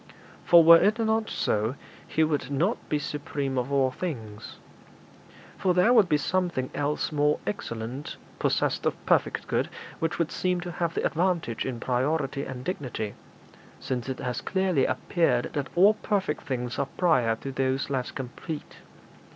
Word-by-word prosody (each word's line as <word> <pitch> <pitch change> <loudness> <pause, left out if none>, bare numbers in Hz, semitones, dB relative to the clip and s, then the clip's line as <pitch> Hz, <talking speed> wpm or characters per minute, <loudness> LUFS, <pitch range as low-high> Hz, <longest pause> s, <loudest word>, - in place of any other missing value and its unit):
For 170 -1 +7
were 165 +1 +9
it 215 +2 +3
not 220 -1 +1
so, 110 +4 0 0.3
He 160 - +2
would 145 -4 0
not 165 - -1
be 150 - +1
supreme 145 -2 -3
of 125 +3 -3
all 135 -2 +3
things; 115 -10 -6 1.0
for 180 -2 +2
there 185 +7 +5
would 215 -7 +5
be 150 - +4
something 170 -5 -1
else 145 +2 -1
more 150 0 +2
excellent, 115 +6 -5 0.2
possessed - - +1
of - - 0
perfect - - +2
good, - - 0 0.3
which 165 0 -1
would 170 -2 0
seem 180 -1 0
to 175 0 -5
have 170 -1 -2
the - - 0
advantage 165 -9 0
in 125 -3 -4
priority 135 +3 0
and 125 -1 -6
dignity, 125 - -3 0.7
since 125 0 -3
it 130 - -3
has 125 0 -3
clearly 185 -7 +1
appeared 165 +6 +1
that 145 -3 -2
all 195 +5 +7
perfect 195 -7 -2
things 125 -2 -3
are 140 - 0
prior 130 -11 +3
to 135 +4 -6
those 135 +1 -1
less 130 -2 -1
complete. 140 +4 -7
145 Hz, 160 wpm, -27 LUFS, 130-175 Hz, 1.0 s, were